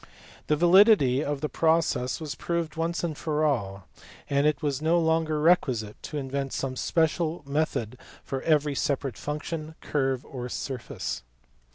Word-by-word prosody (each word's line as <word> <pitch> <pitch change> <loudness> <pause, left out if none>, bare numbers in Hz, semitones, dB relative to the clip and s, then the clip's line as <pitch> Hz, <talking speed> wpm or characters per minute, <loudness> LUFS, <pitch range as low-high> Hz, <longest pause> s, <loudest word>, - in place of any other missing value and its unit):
The 150 - +3
validity 175 - +5
of 145 -2 -3
the 150 - 0
process 160 -5 +1
was 155 -3 -4
proved 170 0 -3
once 170 +1 -1
for 155 0 -1
all, 100 - -1 0.4
and 140 +1 +3
it 150 -2 0
was 145 -1 -1
no 165 +2 +3
longer 160 -1 +1
requisite 130 -10 +2
to 150 - -5
invent 135 -1 -3
some 130 -1 -2
special 165 +3 0
method 140 -5 -2 0.2
for 135 -1 -4
every 150 -2 +2
separate 135 -3 -1
function, 155 +1 -5
curve, 135 -3 -1
or 125 -2 -6
surface. 125 -1 -4
150 Hz, 145 wpm, -27 LUFS, 135-160 Hz, 0.4 s, validity